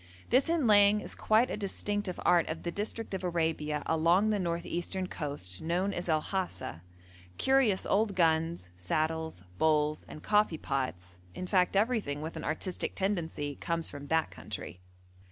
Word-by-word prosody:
This 260 Hz, +5 st, +4 dB
inlaying 210 Hz, -10 st, +5 dB
is -, -, -7 dB
quite 220 Hz, +3 st, +3 dB
a -, -, -1 dB
distinctive 205 Hz, -1 st, -2 dB
art 175 Hz, -2 st, +4 dB
of 160 Hz, +1 st, -4 dB
the 170 Hz, -, -2 dB
district 215 Hz, +3 st, -3 dB
of 190 Hz, -1 st, -3 dB
Arabia 160 Hz, -4 st, -1 dB
along 170 Hz, +6 st, +3 dB
the 210 Hz, -, +1 dB
north 170 Hz, -2 st, -2 dB
eastern 185 Hz, +2 st, -3 dB
coast 140 Hz, -, -4 dB
known 180 Hz, +5 st, 0 dB
as 175 Hz, 0 st, -4 dB
El 155 Hz, -1 st, +2 dB
Hasa; 185 Hz, -, -3 dB, 0.6 s
curious 265 Hz, -, +3 dB
old 205 Hz, 0 st, +1 dB
guns, 165 Hz, -, +1 dB
saddles, 155 Hz, -, -2 dB, 0.2 s
bowls, 155 Hz, -1 st, +2 dB
and 155 Hz, -, -10 dB
coffee 210 Hz, -6 st, +3 dB
pots, 95 Hz, -12 st, -3 dB, 0.2 s
in 185 Hz, -, -4 dB
fact 180 Hz, 0 st, +2 dB
everything 205 Hz, -, +1 dB
with 160 Hz, +2 st, -5 dB
an -, -, -5 dB
artistic 175 Hz, +4 st, -3 dB
tendency, 165 Hz, -7 st, -2 dB
comes 165 Hz, -1 st, -2 dB
from 145 Hz, 0 st, -9 dB
that 160 Hz, +1 st, +1 dB
country. 90 Hz, -, -7 dB
170 Hz, 155 wpm, -31 LUFS, 155-200 Hz, 0.6 s, inlaying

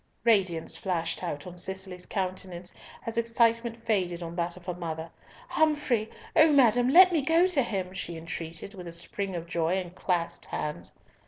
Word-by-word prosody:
Radiance 190 Hz, -8 st, +2 dB
flashed 180 Hz, -6 st, -2 dB
out 150 Hz, -5 st, -4 dB
on 180 Hz, -1 st, -9 dB
Cicely's 190 Hz, 0 st, -5 dB
countenance 185 Hz, -2 st, -4 dB, 0.3 s
as 230 Hz, 0 st, -1 dB
excitement 230 Hz, 0 st, +1 dB
faded 180 Hz, -5 st, 0 dB
on 170 Hz, 0 st, -6 dB
that 175 Hz, 0 st, -2 dB
of 180 Hz, -, -14 dB
her 180 Hz, -, -2 dB
mother: 165 Hz, -2 st, -5 dB, 0.4 s
"Humfrey! 295 Hz, -, +1 dB, 0.3 s
O 315 Hz, -1 st, +7 dB
madam! 245 Hz, -3 st, +5 dB
let 365 Hz, +6 st, +9 dB
me 320 Hz, -, +3 dB
go 325 Hz, +5 st, +4 dB
to 360 Hz, -7 st, +2 dB
him!" 190 Hz, -6 st, -3 dB
she 170 Hz, -3 st, -5 dB
entreated, 165 Hz, +3 st, -6 dB
with 180 Hz, -3 st, -9 dB
a -, -, -6 dB
spring 185 Hz, +3 st, -4 dB
of 170 Hz, -1 st, -4 dB
joy 170 Hz, +1 st, 0 dB
and 180 Hz, -2 st, -4 dB
clasped 175 Hz, -2 st, -2 dB
hands. 150 Hz, -, -4 dB
185 Hz, 170 wpm, -28 LUFS, 170-230 Hz, 0.4 s, let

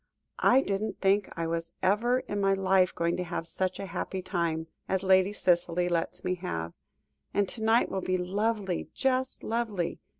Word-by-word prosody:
"I 260 Hz, +2 st, +5 dB
didn't 200 Hz, +2 st, -2 dB
think 195 Hz, +1 st, +2 dB
I 165 Hz, -, -1 dB
was 165 Hz, +1 st, -3 dB
ever 235 Hz, +7 st, +3 dB
in 205 Hz, -4 st, -3 dB
my 195 Hz, 0 st, +3 dB
life 190 Hz, -1 st, +3 dB
going 170 Hz, 0 st, +1 dB
to 180 Hz, -, -1 dB
have 170 Hz, -1 st, -4 dB
such 185 Hz, +2 st, -2 dB
a 200 Hz, -, -4 dB
happy 185 Hz, +1 st, -4 dB
time, 170 Hz, -3 st, -1 dB, 0.2 s
as 190 Hz, 0 st, 0 dB
Lady 190 Hz, +1 st, +4 dB
Cicely 175 Hz, -2 st, +1 dB
lets 170 Hz, -1 st, -2 dB
me 185 Hz, -, 0 dB
have, 85 Hz, -, -4 dB, 0.6 s
and 205 Hz, -1 st, +3 dB
to 225 Hz, -, -4 dB
night 225 Hz, +2 st, +3 dB
will 190 Hz, -, -1 dB
be 185 Hz, 0 st, 0 dB
lovely, 195 Hz, 0 st, -1 dB
just 260 Hz, -1 st, 0 dB
lovely. 220 Hz, -6 st, -2 dB
190 Hz, 175 wpm, -29 LUFS, 175-205 Hz, 0.6 s, I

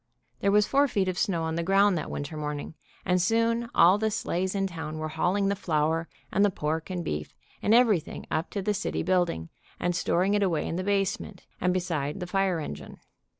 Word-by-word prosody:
There 200 Hz, -, +1 dB
was 210 Hz, 0 st, +5 dB
four 280 Hz, +4 st, +3 dB
feet 200 Hz, -7 st, 0 dB
of 185 Hz, -1 st, -2 dB
snow 170 Hz, -4 st, 0 dB
on 160 Hz, 0 st, -2 dB
the 170 Hz, -, -1 dB
ground 195 Hz, +2 st, +4 dB
that 160 Hz, -, -3 dB
winter 145 Hz, +2 st, -5 dB
morn 150 Hz, -1 st, -3 dB
ing, 145 Hz, -, -8 dB, 0.3 s
and 180 Hz, -1 st, +2 dB
soon 230 Hz, +3 st, +1 dB
all 180 Hz, +4 st, +6 dB
the 220 Hz, 0 st, +1 dB
sleighs 190 Hz, -2 st, -2 dB
in 195 Hz, -1 st, +1 dB
town 160 Hz, -4 st, -5 dB
were 155 Hz, 0 st, -3 dB
hauling 195 Hz, +5 st, +1 dB
the 200 Hz, -, +1 dB
flour 160 Hz, -2 st, 0 dB, 0.2 s
and 200 Hz, -, +3 dB
the 205 Hz, -, +5 dB
pork 160 Hz, -2 st, -3 dB
and 180 Hz, -2 st, -3 dB
beef, 75 Hz, 0 st, -4 dB, 0.3 s
and 205 Hz, -, +1 dB
everything 225 Hz, -8 st, +3 dB
up 160 Hz, +3 st, -1 dB
to 200 Hz, -, -4 dB
the 210 Hz, -, +1 dB
city 205 Hz, +1 st, -2 dB
building, 175 Hz, -, 0 dB, 0.3 s
and 175 Hz, 0 st, 0 dB
storing 180 Hz, +3 st, +1 dB
it 205 Hz, -, +2 dB
away 170 Hz, -6 st, +1 dB
in -, -, -3 dB
the 185 Hz, -, -2 dB
base 195 Hz, -1 st, +1 dB
ment, -, -, -11 dB, 0.2 s
and 180 Hz, -, +2 dB
beside 165 Hz, -4 st, -2 dB
the 180 Hz, -, -3 dB
fire 190 Hz, -1 st, +1 dB
engine. 75 Hz, -, -7 dB
180 Hz, 220 wpm, -27 LUFS, 160-200 Hz, 0.3 s, all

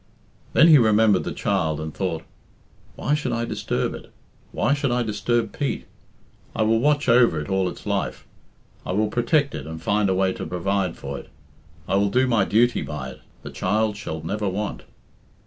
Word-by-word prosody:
Then 165 Hz, -, +7 dB
he 155 Hz, -4 st, +8 dB
remembered 110 Hz, -3 st, +4 dB
the -, -, -3 dB
child 80 Hz, -7 st, -1 dB
and 80 Hz, -1 st, -5 dB
thought, 90 Hz, -4 st, -3 dB, 0.7 s
"Why 145 Hz, -, -1 dB
should 145 Hz, -5 st, -1 dB
I 115 Hz, 0 st, -1 dB
disturb 110 Hz, -2 st, -2 dB
it? -, -, -10 dB, 0.4 s
Why 135 Hz, -, +1 dB
should 140 Hz, -1 st, 0 dB
I 125 Hz, 0 st, +1 dB
disturb 110 Hz, +1 st, -1 dB
Pete? 140 Hz, -, -2 dB, 0.7 s
I 110 Hz, -, +2 dB
will 110 Hz, +1 st, +3 dB
watch 145 Hz, +3 st, +2 dB
over 115 Hz, -9 st, +5 dB
it 75 Hz, -, -6 dB
all 95 Hz, -1 st, +1 dB
its -, -, -11 dB
life. -, -, -2 dB, 0.6 s
I -, -, -3 dB
will 105 Hz, +2 st, +1 dB
protect 140 Hz, +6 st, +1 dB
it -, -, -6 dB
and 80 Hz, 0 st, -6 dB
find 100 Hz, +4 st, +1 dB
a 95 Hz, -, +2 dB
way 95 Hz, 0 st, +2 dB
to -, -, -6 dB
provide 95 Hz, 0 st, -1 dB
for 70 Hz, 0 st, -6 dB
it. -, -, -14 dB, 0.6 s
I 95 Hz, -, +2 dB
will 100 Hz, 0 st, +2 dB
do 130 Hz, +5 st, +3 dB
my 115 Hz, -6 st, +2 dB
duty 120 Hz, +5 st, +2 dB
by 75 Hz, -4 st, -5 dB
it. 65 Hz, -, -12 dB, 0.2 s
The -, -, -7 dB
child 105 Hz, +3 st, 0 dB
shall 80 Hz, -6 st, -6 dB
never 105 Hz, +4 st, -2 dB
want." 100 Hz, +2 st, -4 dB
105 Hz, 190 wpm, -23 LUFS, 95-120 Hz, 0.7 s, he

